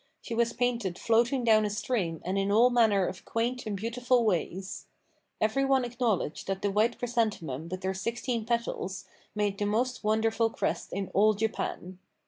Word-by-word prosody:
She 235 - -7
was 235 0 +2
painted 235 -7 -1
floating 240 +3 +2
down 220 -2 +5
a 210 - 0
stream 205 -6 -2
and 185 +2 -1
in 195 0 +1
all 235 +4 +5
manner 220 -6 +4
of 185 - -5
quaint 240 +1 -2
and 205 -2 -2
beautiful 240 +3 +1
ways. 190 0 -2 0.5
Every 220 +6 +1
one 270 -2 +3
acknowledged 230 -9 -1
that 195 0 -3
the 200 - +1
white 215 +4 +2
chrysanthemum 205 - -2
with 185 +1 -5
her 190 0 0
sixteen 230 +4 -2
petals 215 -4 -2 0.3
made 205 -1 -1
the 205 - 0
most 245 +4 0
wonderful 225 +1 +2
crest - - -2
in 195 0 -3
all 210 +3 +4
Japan. 190 -3 -3
220 Hz, 170 wpm, -29 LUFS, 195-235 Hz, 0.5 s, down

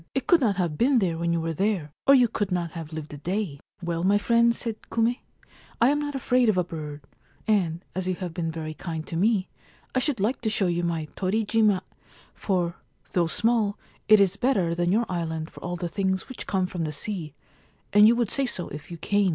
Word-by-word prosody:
It 270 - 0
could 345 -4 +5
not 215 -6 +2
have 175 -5 -1
been 260 +2 +4
there 185 -7 +1
when 170 +1 -1
you 170 - +1
were, 165 0 -1 0.2
or 275 - +9
you 250 -2 +6
could 205 -3 -2
not 175 -2 -1
have 165 -2 -7
lived 155 -2 -6
a - - -6
day/ 180 -2 -2
{ - - -41
Well, 170 0 -2
my 200 +2 +4
friends,' 235 +2 +3
said 225 -2 -4
Kume, 235 +2 +1 0.3
* - - -26
I 235 - +5
am 290 +1 +2
not 290 -1 -3
afraid 250 -2 +2
of 205 - +2
a 180 - +3
bird, 150 -4 -7 0.4
and, 180 -5 +1
as 185 0 -3
you 185 - 0
have 175 -2 -5
been 165 -1 -2
very 155 -1 -5
kind 160 -1 -5
to - - -6
me, 195 +2 +2 0.5
I 260 - +2
should 265 -3 0
like 215 +7 0
to 225 - 0
show 215 -3 +1
you 175 -1 0
my 165 -2 -1
Torijima, 210 0 +2 0.5
for, 175 -3 -1 0.3
though 175 -2 +2
small, 220 +2 +1 0.3
it 215 0 +8
is 200 -1 +3
better 200 -10 +1
than 175 +1 +1
your 230 +4 +2
island 160 -3 -3
for - - -12
all 175 +1 -4
the 175 0 -3
things 190 +1 -1
which 260 - -8
come 190 -2 +1
from 180 -2 -4
the 155 - -2
sea, 155 -1 -5 0.6
and 210 +1 +8
you 235 - +5
would 235 -3 0
say 275 -2 +1
so 180 -7 -2
if 150 0 -9
you 170 - -7
came. 200 +3 +2
185 Hz, 230 wpm, -26 LUFS, 170-220 Hz, 0.6 s, or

